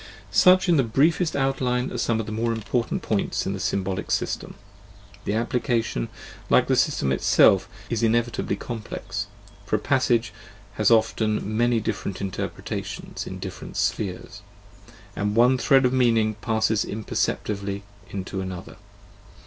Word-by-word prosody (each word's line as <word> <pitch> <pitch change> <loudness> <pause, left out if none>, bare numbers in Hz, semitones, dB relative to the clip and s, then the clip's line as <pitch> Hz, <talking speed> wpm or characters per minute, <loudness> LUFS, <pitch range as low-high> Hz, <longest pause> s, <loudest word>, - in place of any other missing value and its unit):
Such, 185 +1 +6
in 170 -2 +4
the 135 - +4
briefest 155 +8 +2
outline, 130 -2 0
are - - -4
some 115 -1 +1
of 110 - -2
the 110 - -6
more 115 +2 0
important 115 +2 -2
points - - -1
in - - -1
the - - -5
symbolic 95 -1 -2
system. - - -2 0.7
The 100 - -1
application, 115 - 0 0.4
like - - +5
the - - +2
system 65 - +1
itself, 95 +7 +4 0.2
is 115 -2 -2
inevitably 115 -2 +1
complex, 105 -2 -5 0.4
for 105 - -1
a - - +1
passage 120 -3 +1 0.4
has 105 -1 +2
often 110 -2 +2
many 120 0 +3
different 100 -2 -3
interpretations 95 -2 -5
in - - -6
different - - -7
spheres, 95 -3 -2 0.7
and 105 0 -1
one 125 +3 +5
thread 135 0 +4
of 125 - +2
meaning 115 -4 +3
passes 110 0 0
imperceptibly 100 -1 -2 0.3
into 95 0 -4
another. 95 -1 -7
110 Hz, 140 wpm, -24 LUFS, 100-125 Hz, 0.7 s, Such